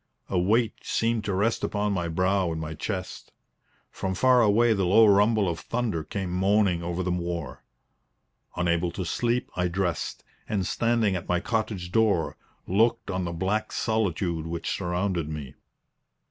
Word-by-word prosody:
A 95 - +1
weight 110 +5 +1
seemed 115 -1 0
to 100 - -1
rest 110 +4 +1
upon 105 0 0
my 90 -3 -1
brow 90 +2 +1
and 80 - -3
my 80 0 -4
chest. 90 +3 -5 0.6
From 95 0 -3
far 125 +4 +5
away 115 +2 +4
the 100 -2 0
low 105 +5 +6
rumble 105 0 +4
of 85 -2 -2
thunder 115 -9 -2
came 95 +2 -4
moaning 95 -1 +2
over 85 +2 -2
the 90 - -1
moor. 85 -6 -4 0.9
Unable 85 0 +1
to 95 - -4
sleep, 120 +7 -1
I 90 0 +1
dressed, 90 -2 -2 0.3
and 100 -3 0
standing 115 -1 +1
at 90 - -5
my 90 0 +2
cottage 110 -5 -2
door, 110 -6 +2 0.3
looked 110 +2 +1
on 90 -1 -2
the 85 - -3
black 95 +6 -1
solitude 90 -7 -1
which 85 0 -3
surrounded 90 -3 -1
me. 75 -4 -6
95 Hz, 160 wpm, -26 LUFS, 85-110 Hz, 0.9 s, low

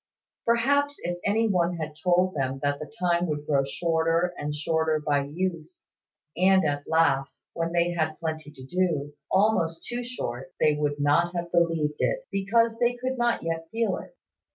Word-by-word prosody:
Perhaps, 285 +5 +2
if 175 0 -3
any 220 +3 +2
one 180 -3 +1
had 155 -2 -5
told 180 +3 +2
them 135 -2 -1
that 145 0 0
the 155 - -6
time 175 0 +2
would 150 -1 -3
grow 140 -2 +2
shorter 165 +4 0
and 150 -2 -4
shorter 160 0 +1
by 145 -2 +1
use, 165 +2 -4 0.5
and 190 0 +4
at 145 -1 -1
last, 140 -4 +2
when 165 0 -2
they 175 0 +2
had 160 -2 -1
plenty 155 -2 -4
to 140 -3 -12
do, 150 -2 -1 0.2
almost 185 -5 +2
too 245 0 -3
short, 135 - -6
they 150 - +4
would 145 -1 -1
not 165 +5 +2
have 170 0 -3
believed 165 -3 +1
it, - - 0
because 225 +4 +2
they 245 0 +2
could 255 0 -2
not 240 -1 +1
yet 165 0 -3
feel 230 +4 0
it. - - -11
165 Hz, 175 wpm, -26 LUFS, 150-190 Hz, 0.5 s, and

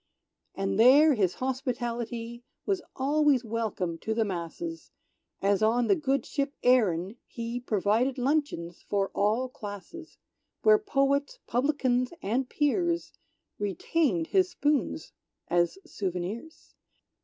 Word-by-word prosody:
And 195 +1 -1
there 285 +6 +7
his 190 -7 +1
hospitality 240 -2 -3 0.2
Was 390 -3 0
always 285 -1 +2
welcome 210 -7 -2
to 220 - -2
the 225 -1 +2
masses; 200 - -5 0.5
As 200 0 +2
on 230 +3 +3
the 390 - +4
good 275 -4 0
ship 280 0 -2
"Erin" 210 -5 +3
he 235 +1 -4
Provided 230 +3 +1
luncheons 255 - -1
for 200 -1 +1
all 220 +6 +1
classes; 235 - -9 0.5
Where 430 -1 +6
poets, 280 -7 0
publicans 255 0 +1
and 245 +6 0
peers, 340 +3 0 0.5
Retained 205 - 0
his 375 -1 +4
spoons 295 -4 -1 0.4
as 175 - +2
souvenirs. 200 - -5
245 Hz, 110 wpm, -28 LUFS, 205-285 Hz, 0.5 s, there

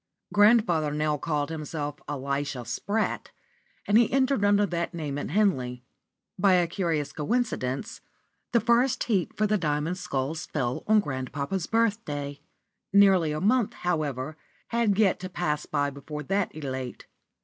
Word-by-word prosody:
Grandfather 205 -8 +4
now 150 0 +1
called 150 0 -2
himself 150 -2 -4
Elisha 140 -2 -3
Spratt, 210 - -2 0.6
and 210 +2 +5
he 235 - +3
entered 265 -4 +2
under 205 0 +4
that 170 -1 -3
name 145 -4 -3
at - - -4
Henley. 130 - +1 0.6
By 195 0 +5
a 180 -1 +4
curious 165 -4 -2
coincidence, 150 - -2 0.5
the 235 - +4
first 245 +3 +2
heat 195 -7 -1
for 215 - +2
the 210 0 +1
Diamond 155 +2 -1
Sculls 140 +1 -3
fell 125 -4 -2
on 215 0 +5
grandpapa's 140 +5 -3
birthday. 200 -11 -1 0.5
Nearly 190 -5 +5
a 150 - -2
month, 215 +4 +2
however, 155 -4 -2 0.3
had 230 -4 +1
yet 205 -5 +3
to 185 0 -6
pass 150 -5 -2
by 145 -1 0
before 150 +2 -7
that 195 +5 0
elate. 130 -4 -5
165 Hz, 140 wpm, -27 LUFS, 145-205 Hz, 0.6 s, and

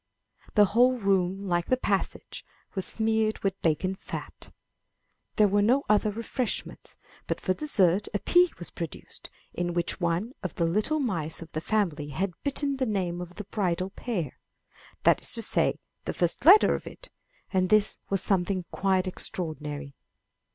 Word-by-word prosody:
The 210 - +7
whole 245 +5 +3
room, 195 -2 0
like 175 -2 0
the 255 - +2
passage, 200 -6 -2 0.3
was 190 -2 +2
smeared 220 -1 +2
with 195 0 -1
bacon 170 +4 +1
fat. 190 - -9 0.8
There 210 - +5
were 205 +1 +2
no 250 +7 +3
other 210 0 +3
refreshments, 230 +3 -4 0.3
but - - -2
for 185 - 0
dessert 200 - +2
a - - 0
pea 355 - +4
was 175 - -7
pro 170 - -4
duced, - - -11 0.2
in 175 -1 -2
which 175 +2 -1
one 175 +8 -1
of 185 - -5
the 170 - +1
little 215 - +1
mice 170 - -3
of 160 - -16
the 155 - -4
family 170 -8 -1
had 180 +6 -2
bitten 280 0 -1
the 260 -1 0
name 180 -4 -2
of 180 0 -9
the 210 - -6
bridal 185 -2 -2
pair; 195 - -4 0.6
that - - +4
is - - +1
to - - +3
say, - - +2 0.3
the - - -3
first 175 +7 -1
letter 405 +4 +8
of - - -5
it, - - -10 0.4
and 185 -1 +2
this 215 -1 +3
was 195 -2 +1
something 185 -1 0
quite 190 -1 +1
extraor 175 -3 +1
dinary. 150 -1 -7
195 Hz, 170 wpm, -27 LUFS, 175-215 Hz, 0.8 s, letter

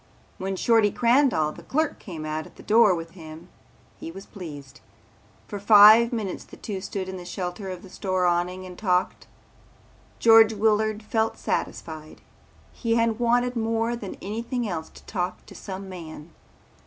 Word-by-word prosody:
When 195 +1 -3
Shorty 225 +1 +3
Crandall 235 - +2
the - - -12
clerk 310 +2 -1
came 165 -5 -8
out 155 0 -4
at - - -19
the - - -14
door 215 -3 +5
with 165 0 -7
him 165 0 -12 0.5
he - - -7
was 195 +3 -10
pleased. 150 -8 -10 0.7
For 205 - -6
five 215 +3 +8
minutes 215 -6 -4
the - - -14
two 200 -3 -5
stood 190 -1 -4
in 190 0 -6
the 180 - -8
shelter 180 +2 -5
of 185 -1 -7
the 190 - -12
store 185 -2 -1
awning 180 +1 0
and 180 -1 -9
talked. 180 -3 0 0.9
George 225 -1 +6
Willard 215 0 +1
felt 220 +1 -1
satisfied. 155 -1 -4 0.5
He 230 -2 -1
had 230 -1 +1
wanted 245 +1 +2
more 225 +1 0
than 205 -5 -7
anything 230 +3 -3
else 160 -4 -4
to - - -17
talk 180 -3 -4
to - - -13
some 195 0 -7
man. 165 -3 -9
195 Hz, 165 wpm, -25 LUFS, 180-225 Hz, 0.9 s, five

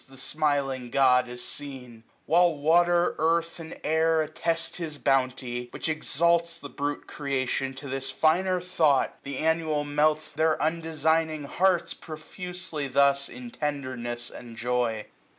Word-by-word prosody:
The 135 - -14
Smiling 135 -3 -1
God 125 -1 +4
is 125 0 -6
seen; 125 -5 -8 0.2
while 170 +1 +4
water, 175 +4 +3
earthy 165 +1 +1
And 160 0 -9
air 160 0 +3
attest 165 +2 -2
his 160 -4 -5
bounty 130 -3 0
j - - -18
which - - -4
exalts 170 +2 +1
860 - - -19
The - - -19
brute 145 +1 -3
creation 135 -1 -2
to 140 - -8
this 135 0 -2
finer 180 +4 +2
thought. 160 -6 +2
And 140 0 -5
annual 160 -1 +1
melts 150 +1 +1
their 160 +1 +2
undesigning 160 -1 0
hearts 180 +5 +1
Profusely 165 -1 -6
thus 140 +1 +3
in 245 -1 -9
tenderness 130 - -4
and 115 -2 -10
joy. 120 -3 0
150 Hz, 140 wpm, -27 LUFS, 135-165 Hz, 0.2 s, God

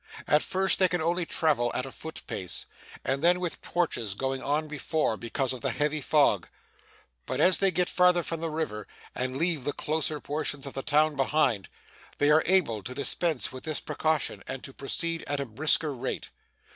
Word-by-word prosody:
At 150 - +4
first, 190 0 +2
they 185 - +6
can 180 -1 -1
only 170 +1 0
travel 135 -7 +2
at 125 - -1
a 135 - -7
foot 160 +4 -8
pace, 90 -3 -3 0.4
and 135 +3 0
then 175 +1 +5
with 180 -2 -3
torches 120 - -1
going 135 +3 -2
on 150 +2 0
before, 150 -4 -1
because 125 +3 -2
of 130 - -7
the 135 - 0
heavy 150 +4 0
fog. 140 - +3 0.8
But, - - -2
as 185 0 +6
they 195 - +4
get 180 -1 +1
farther 180 -1 +4
from 165 0 -4
the 165 - -1
river, 155 -10 -3 0.3
and 130 +1 -2
leave 165 -3 +2
the 145 - -1
closer 155 0 -2
portions 145 -1 -2
of 140 - -6
the 135 - -3
town 150 +1 +3
behind, 135 -7 +1 0.5
they 145 +1 +3
are 155 +1 +6
able 165 - +2
to 125 +5 -7
dispense 145 -1 -1
with 130 - -9
this 155 -2 -2
precaution 155 -2 -1
and 135 - -5
to 135 - -9
proceed 165 +5 -2
at 145 -1 -1
a 140 - -2
brisker 150 +5 +2
rate. 125 - -4
150 Hz, 195 wpm, -28 LUFS, 130-165 Hz, 0.8 s, they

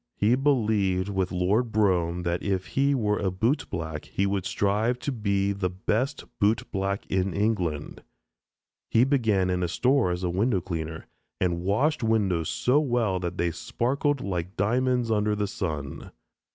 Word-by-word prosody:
He 105 +3 +3
believed 110 -8 +1
with 95 -2 -1
Lord 100 +7 +1
Brougham, 90 -5 +1
that 85 0 -1
if 95 -2 -2
he 140 +1 +2
were 105 -4 0
a 95 - 0
bootblack 90 - -2
he 100 - -1
would 100 -1 -1
strive 105 +5 +1
to 140 - -3
be 100 -4 0
the 100 -2 -1
best 110 +9 -1 0.2
bootblack 100 -2 0
in 95 -1 0
England. 95 -8 -1 0.9
He 115 - +4
began 110 -9 +2
in 90 0 0
a 90 - +1
store 125 +4 +2
as 90 +1 -2
a 90 - 0
window 100 +3 +1
cleaner, 80 -3 -5 0.3
and 85 -2 0
washed 120 - +1
windows 100 -8 +1
so 130 +4 +2
well 120 -9 +1
that 90 -1 -4
they 85 0 +1
sparkled 140 - -1
like 90 -1 -4
diamonds 125 +3 +1
under 105 -1 +1
the 105 0 0
sun. 80 -8 -4
100 Hz, 155 wpm, -26 LUFS, 90-115 Hz, 0.9 s, He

